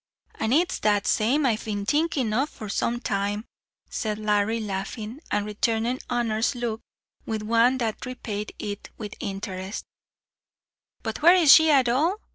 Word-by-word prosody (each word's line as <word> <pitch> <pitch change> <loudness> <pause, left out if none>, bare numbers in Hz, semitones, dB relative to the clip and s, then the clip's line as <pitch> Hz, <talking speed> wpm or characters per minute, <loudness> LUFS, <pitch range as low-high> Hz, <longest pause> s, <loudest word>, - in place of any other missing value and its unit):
"An' 220 - 0
it's 335 +6 +2
that 205 -1 +2
same 265 +7 +2
I've 225 -4 +1
been 205 -2 -3
thinking 290 -4 +1
of 270 +7 +1
for 215 - -9
some 235 +4 -1
time," 205 +1 -2 0.4
said 215 -2 -3
Larry, 210 +1 +1
laughing, 215 +4 -5
and 205 0 0
returning 225 +4 0
Honor's 235 0 0
look 235 -2 -3 0.5
with 220 -1 -2
one 230 +4 +3
that 225 -4 -2
repaid 210 -4 -5
it 205 -1 -6
with 210 -2 -6
interest 195 -1 -5 1.2
"But - - -4
where 345 +4 +8
is 325 -6 +8
she 320 -1 +7
at 270 -4 +5
all? 300 +10 +2
225 Hz, 150 wpm, -25 LUFS, 210-255 Hz, 1.2 s, where